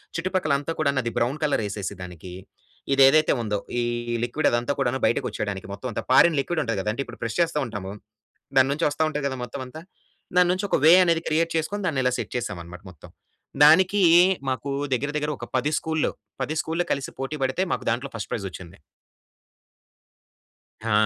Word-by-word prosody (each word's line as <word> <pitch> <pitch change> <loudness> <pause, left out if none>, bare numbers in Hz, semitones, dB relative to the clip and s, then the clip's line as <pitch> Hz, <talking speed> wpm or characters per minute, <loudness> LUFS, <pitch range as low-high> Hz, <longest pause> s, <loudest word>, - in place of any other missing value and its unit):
చుట్టుపక్కల 170 -3 0
అంతా 145 +3 -5
కూడాను 140 -3 +1
అది 115 - -2
బ్రౌన్ 125 +5 0
కలర్ 145 -7 +1
యేసేసి 100 -1 -4
దానికి. 90 0 -9 0.6
ఇది 135 - +3
ఏదైతే 155 +3 +4
ఉందో 105 -2 -1 0.2
ఈ - - 0 0.4
లిక్విడ్ 145 +6 0
అదంతా 120 +3 0
కూడాను 130 -1 0
బయటకి - - +1
వచ్చేయడానికి 100 -3 -4
మొత్తం 100 +6 -6
అంతా - - -4
ఫారిన్ 160 +3 +6
లిక్విడ్ 165 +2 -2
ఉంటది 115 -6 -2
గదా! 105 - -2
అంటే 140 - -3
ఇప్పుడు - - -12
ప్రెస్ 115 -1 -3
చేస్తా 165 -3 +1
ఉంటాము. 105 -5 -6 0.7
దాని 130 0 +5
నుంచి 155 +4 -1
వస్తా 145 +2 -1
ఉంటది 150 -2 -3
గదా 130 -1 -4
మొత్తం 130 +2 -6
అంతా. 155 +6 -10 0.6
దాని 180 -1 +5
నుంచి 185 +3 -1
ఒక - - +3
వే 165 - +9
అనేది 165 -2 +1
క్రియేట్ 165 +2 +1
చేసుకొని 200 +6 -2
దాన్ని 140 -5 0
ఇలా 125 - +2
సెట్ - - -5
చేసామన్నమాట 90 -6 -6
మొత్తం. 85 - -15 0.6
దానికి 185 +6 +5 0.5
మాకు 130 +2 -4 0.3
దగ్గర 140 +4 -2
దగ్గర 150 0 -1
ఒక 120 - -6
10 145 +5 0
స్కూల్‌ల్లు. 160 -1 -1 0.3
10 155 - -3
స్కూల్‌ల్లు 165 +2 -2
కలిసి 140 -1 -5
పోటీ 135 +3 -3
పడితే 130 +8 0
మాకు - - -4
దాంట్లో 125 +4 -3
ఫస్ట్ 110 - -6
ప్రైజ్ 100 - -3
వచ్చింది. 90 -2 -11 2.1
హా! 115 - -2
135 Hz, 185 wpm, -24 LUFS, 115-160 Hz, 2.1 s, వే